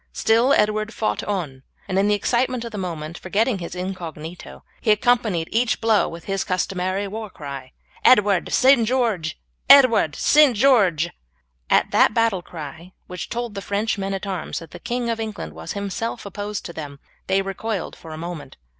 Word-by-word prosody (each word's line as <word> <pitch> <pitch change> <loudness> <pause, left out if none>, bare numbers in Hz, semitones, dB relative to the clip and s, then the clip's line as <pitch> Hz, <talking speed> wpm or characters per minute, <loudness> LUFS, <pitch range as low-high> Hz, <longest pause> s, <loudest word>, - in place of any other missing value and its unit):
Still 230 +4 +3
Edward 215 0 +1
fought 105 0 -1
on, 165 -10 -3 0.3
and 190 -1 0
in 200 - +3
the 210 - +3
excitement 240 +3 0
of 230 - -6
the 210 - -6
moment, 170 -3 -5
forgetting 205 +3 0
his 170 +1 -6
incognito, 175 -3 -7 0.2
he 225 - -1
accompanied 210 -6 +2
each 235 +1 +1
blow 225 -2 +2
with 170 0 -9
his 195 -1 -1
customary 185 +1 -1
war 215 +1 -6
cry 140 -6 -8 0.3
"Edward, 205 -6 +4
St. 260 -4 +5
George! 220 -11 0 0.3
Edward, 255 - +7
St. 290 -6 +5
George!" 195 - +3 0.6
At - - +3
that - - +4
battle 230 -5 +2
cry, 165 +2 -9
which 180 -2 -7
told 240 -2 -4
the 200 - -5
French 205 +2 -1
men 195 0 -2
at 195 - -5
arms 190 -4 -4
that 165 -2 -8
the - - -10
King 240 0 -3
of 230 -1 -1
England 215 - -5
was 80 +1 -6
himself 200 +3 -4
opposed 205 +1 -5
to 170 - -7
them, 145 -3 -8 0.3
they 195 +1 +2
recoiled 195 0 -4
for 165 - -12
a 155 - -7
moment. 170 -1 -7
200 Hz, 175 wpm, -22 LUFS, 170-225 Hz, 0.6 s, Edward